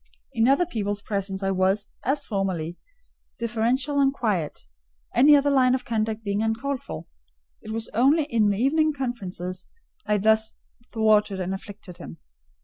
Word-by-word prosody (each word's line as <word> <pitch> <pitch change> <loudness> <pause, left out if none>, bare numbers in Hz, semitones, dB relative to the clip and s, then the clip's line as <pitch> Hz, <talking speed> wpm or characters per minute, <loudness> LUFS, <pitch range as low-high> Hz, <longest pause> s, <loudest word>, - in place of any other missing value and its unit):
In 225 - +2
other 280 +7 +4
people's 205 - -2
presence 195 -1 -2
I 195 - +1
was, 190 +2 +1 0.2
as 280 +3 -1
formerly, 185 -5 -2 0.6
deferential 240 +5 0
and 270 -1 +4
quiet; 205 - -2 0.5
any 295 +3 +7
other 285 0 +3
line 255 -2 +4
of 255 0 -5
conduct 220 -2 -2
being 200 0 -1
uncalled 235 +5 -1
for: 80 - -7 0.6
it - - -11
was 225 0 -3
only 275 +8 +4
in 230 -7 +2
the 200 - 0
evening 310 +6 +2
conferences 190 -9 -5 0.4
I 210 - +2
thus 220 +2 +2 0.4
thwarted 215 -3 +2
and 185 +1 -2
afflicted 195 -2 -9
him. 80 - -9
220 Hz, 150 wpm, -25 LUFS, 195-260 Hz, 0.6 s, any